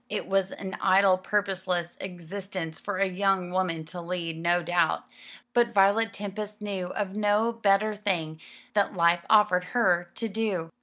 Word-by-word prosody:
It 210 - -3
was 195 -1 +1
an 190 -1 -6
idle 190 0 +5
purposeless 185 -3 -1
existence 180 -1 -6
for 205 -2 -4
a 195 - +3
young 190 -1 0
woman 180 -4 -1
to 175 +2 -8
lead, 170 -1 -4
no 175 +1 +2
doubt; 175 -1 +1 0.5
but 235 -1 +2
Violet 200 +3 +4
Tempest 210 +1 -6
knew 200 -4 -4
of 195 +1 -4
no 210 +2 +2
better 215 -1 +2
thing 170 -7 -2 0.3
that 205 -1 +1
life 170 0 +3
offered 210 -4 +5
her 175 -7 +2
to 230 - -3
do. 200 -6 -2
190 Hz, 155 wpm, -27 LUFS, 175-205 Hz, 0.5 s, idle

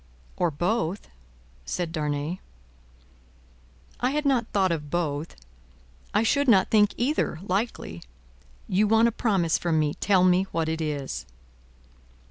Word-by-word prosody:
"Or 175 - +1
both," 175 +4 -2 0.5
said 170 - -3
Darnay. 150 +2 -2 1.6
"I 250 - +1
had 295 +2 -1
not 255 -5 +2
thought 190 -3 +1
of 150 -3 -3
both; 155 -1 -2 0.8
I 210 - +2
should 280 +5 +2
not 195 -6 +4
think 210 -2 +4
either, 250 - 0
likely. 185 - -3 0.7
You 205 +3 +2
want 225 +2 +4
a - - -5
promise 195 -8 +1
from 170 -2 0
me. 150 -1 +1
Tell 190 0 +2
me 185 +1 +3
what 165 -1 -1
it 160 0 -2
is." 145 - -4
180 Hz, 130 wpm, -26 LUFS, 160-220 Hz, 1.6 s, not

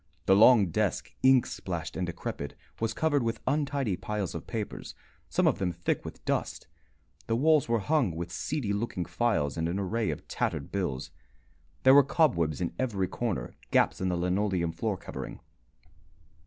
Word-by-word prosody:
The 95 - +5
long 105 -3 +6
desk, - - -1
ink 130 -1 +6
splashed - - -5
and 90 -1 -2
decrepit, 85 -4 -5 0.2
was 115 0 -1
covered 150 -3 +2
with 115 -1 -1
untidy 140 -7 0
piles 105 -1 -3
of 85 - -7
papers, 110 -4 -5 0.3
some - - +1
of - - +3
them 90 -2 0
thick 85 0 -2
with - - -10
dust; - - -2 0.6
the 115 - +1
walls 150 +1 +3
were 115 - +3
hung 125 - +1
with 85 +1 -5
seedy 120 - -2
looking 100 -4 -2
files 80 -13 0
and 80 0 0
an 90 - -2
array 105 +3 -1
of - - -5
tattered - - -2
bills; 90 -10 -2 0.7
there 130 - +8
were 145 - +9
cobwebs 90 - +1
in 85 - -1
every 105 -8 0
corner, 100 - -3 0.2
gaps - - +2
in 95 - +1
the 90 - 0
linoleum 90 -1 0
floor 100 +4 -2
covering. - - -7
100 Hz, 170 wpm, -29 LUFS, 85-120 Hz, 0.7 s, were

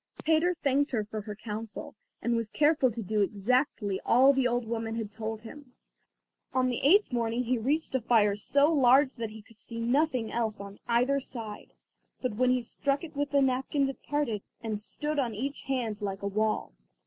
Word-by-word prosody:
Peter 325 +3 +3
thanked 285 -2 +1
her 225 -5 -1
for 215 0 -5
her 210 0 -7
counsel, 215 0 -6 0.3
and 235 0 +1
was 230 -2 -2
careful 295 0 +3
to 230 0 -5
do 210 +2 0
exactly 205 0 0
all 265 +4 +6
the 265 -2 +2
old 245 -1 -1
woman 225 0 -3
had 220 -3 -4
told 220 0 -5
him. 255 +2 -12 0.8
On 255 0 +3
the 245 - -1
eighth 365 +2 +4
morning 235 0 0
he 250 0 0
reached 290 +8 -1
a 260 - +1
fire 210 -3 +3
so 285 +9 +2
large 270 0 +5
that 230 -2 -3
he 215 0 -11
could 225 0 -21
see 230 -1 -7
nothing 250 -1 +1
else 220 -3 -1
on 200 0 -9
either 250 +4 +2
side, 230 -5 -8 0.5
but 255 -4 -2
when 250 +3 +2
he 250 -1 +2
struck 280 +5 -1
it 315 -2 -9
with 285 0 -1
the 280 -1 +3
napkins 270 +2 +1
it 270 - -8
parted, 285 -9 -1 0.2
and 215 -2 -3
stood 295 +7 -3
on 240 -5 -1
each 275 +6 -4
hand 235 -6 -2
like 195 -1 -4
a - - 0
wall. 215 +2 -1
240 Hz, 195 wpm, -29 LUFS, 220-275 Hz, 0.8 s, all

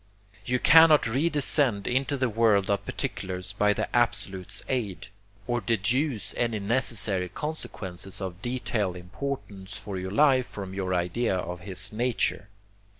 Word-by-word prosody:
You 125 +1 +2
cannot 160 +2 +7
redescend 135 -4 +2
into 135 +3 0
the 130 -1 +1
world 105 -3 +3
of 100 - 0
particulars 95 +1 -4
by 105 0 +3
the - - -2
Absolute's 95 -6 0
aid, 105 -7 -3 0.4
or 120 +1 -1
deduce 115 +5 0
any 115 -2 0
necessary 100 -4 0
consequences 95 - -5
of 95 -1 -6
detail 115 -6 -1
important 95 +1 -6
for 100 -2 -5
your 95 +1 -4
life 130 +3 +4
from 95 -2 -7
your 95 -1 -1
idea 90 +5 0
of 90 0 -4
his 95 +3 -3
nature. 115 -3 -1
105 Hz, 135 wpm, -27 LUFS, 95-125 Hz, 0.4 s, cannot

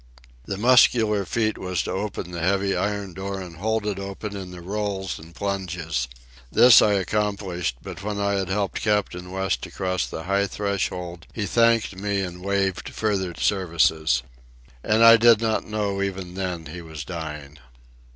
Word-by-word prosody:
The 100 - -3
muscular 110 -3 +4
feat 110 +3 -1
was 90 -5 -2
to - - -4
open 95 -2 -4
the 85 - -5
heavy 95 +3 +1
iron 100 -2 -2
door 95 +2 -4
and 90 -3 -9
hold 110 +3 -1
it 100 -2 -2
open 100 +1 -6
in 95 -2 -6
the 90 0 -9
rolls 95 +1 -3
and 80 +2 -14
plunges. 90 -9 -2 0.4
This 125 -1 +8
I 105 - +4
accomplished; 100 - -1
but - - -8
when 105 0 -3
I 100 0 +1
had 95 -2 -1
helped 100 0 -1
Captain 105 -4 0
West 95 0 -2
across 95 -1 -2
the 80 - -6
high 100 +2 +1
threshold 90 -4 -3
he 110 - -2
thanked 115 -1 +3
me 100 +1 -1
and 90 -1 -6
waived 95 -1 0
further 95 -5 -1
services. 80 -8 +2 0.6
And 110 +2 +3
I 115 0 +10
did 115 -1 +6
not 110 -1 0
know 105 -2 -1
even 95 -2 -3
then 90 -3 -4
he 85 +4 -8
was 80 -3 -8
dying. 75 -4 -7
95 Hz, 165 wpm, -24 LUFS, 90-105 Hz, 0.6 s, I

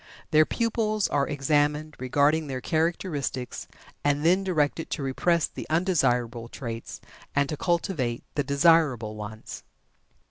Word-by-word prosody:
Their 155 0 +5
pupils 220 -3 0
are 140 -1 +1
examined 145 +1 0
regarding 145 +5 +2
their 130 -2 -3
characteristics, 155 -4 -2 0.4
and 145 +1 +1
then 185 +3 +4
directed 165 -3 0
to 140 - -3
repress 165 +5 +1
the - - -9
undesirable 125 -9 +1
traits, 115 -3 -6 0.4
and 140 0 +3
to 155 - -2
cultivate 155 - -1
the 145 - 0
desirable 140 -6 +3
ones. 105 +1 -8
145 Hz, 120 wpm, -26 LUFS, 130-165 Hz, 0.4 s, Their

